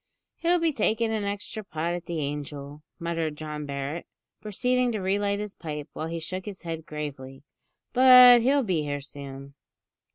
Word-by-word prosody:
"He'll 345 Hz, +1 st, +2 dB
be 330 Hz, -2 st, +1 dB
taking 225 Hz, -2 st, +1 dB
an 215 Hz, -2 st, -1 dB
extra 205 Hz, +2 st, -4 dB
pot 165 Hz, -2 st, -3 dB
at 175 Hz, -1 st, -6 dB
the 170 Hz, -, -3 dB
`Angel,'" 145 Hz, 0 st, -5 dB, 0.2 s
muttered 165 Hz, -3 st, -2 dB
John 150 Hz, -1 st, -6 dB
Barret, 140 Hz, +4 st, -4 dB, 0.3 s
proceeding 250 Hz, +4 st, +1 dB
to 215 Hz, -, -2 dB
re 190 Hz, +1 st, 0 dB
light 200 Hz, 0 st, 0 dB
his 210 Hz, -1 st, -5 dB
pipe, 150 Hz, -3 st, -6 dB
while 160 Hz, -, -4 dB
he 165 Hz, 0 st, -4 dB
shook 185 Hz, +3 st, -5 dB
his 200 Hz, -3 st, -8 dB
head 165 Hz, -2 st, -5 dB
gravely; 135 Hz, -3 st, -7 dB, 0.5 s
"but 250 Hz, -1 st, +9 dB
he'll 275 Hz, +3 st, +3 dB
be 180 Hz, -8 st, 0 dB
here 145 Hz, -1 st, -3 dB
soon." 140 Hz, -1 st, -9 dB
170 Hz, 170 wpm, -26 LUFS, 150-215 Hz, 0.5 s, but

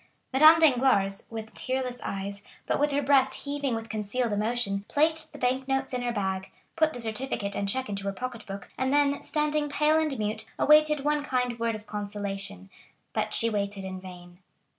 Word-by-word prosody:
Madame 310 Hz, +4 st, +8 dB
Danglars, 250 Hz, -10 st, +3 dB
with 220 Hz, -1 st, -7 dB
tearless 255 Hz, -1 st, -3 dB
eyes, 200 Hz, +1 st, -4 dB, 0.2 s
but -, -, 0 dB
with 295 Hz, +1 st, +2 dB
her 285 Hz, +1 st, 0 dB
breast 270 Hz, -1 st, +3 dB
heaving 285 Hz, -3 st, -1 dB
with 225 Hz, 0 st, -5 dB
concealed 215 Hz, +2 st, -2 dB
emotion, 210 Hz, -2 st, 0 dB
placed 315 Hz, +1 st, +1 dB
the 290 Hz, -, -11 dB
bank 260 Hz, 0 st, 0 dB
notes 270 Hz, 0 st, 0 dB
in 250 Hz, -, -1 dB
her 245 Hz, 0 st, -1 dB
bag, 190 Hz, -3 st, -2 dB, 0.3 s
put 315 Hz, -1 st, +3 dB
the 245 Hz, -, -7 dB
certificate 220 Hz, -3 st, -2 dB
and 200 Hz, 0 st, -1 dB
check 260 Hz, +5 st, -1 dB
into 200 Hz, -1 st, -4 dB
her 200 Hz, -, 0 dB
pocket 240 Hz, +3 st, -6 dB
book, 195 Hz, -1 st, -8 dB
and 260 Hz, 0 st, +1 dB
then, 285 Hz, 0 st, +3 dB
standing 300 Hz, -1 st, 0 dB
pale 300 Hz, +2 st, +3 dB
and 305 Hz, -4 st, 0 dB
mute, 210 Hz, 0 st, -2 dB
awaited 300 Hz, -1 st, +5 dB
one 295 Hz, +1 st, +1 dB
kind 250 Hz, -4 st, -1 dB
word 230 Hz, -1 st, 0 dB
of 215 Hz, 0 st, -9 dB
consolation. 200 Hz, -, -5 dB, 0.4 s
But -, -, -1 dB
she 230 Hz, -, +3 dB
waited 200 Hz, -2 st, -2 dB
in 185 Hz, -1 st, -6 dB
vain. 175 Hz, -1 st, -12 dB
245 Hz, 185 wpm, -27 LUFS, 200-285 Hz, 0.4 s, Madame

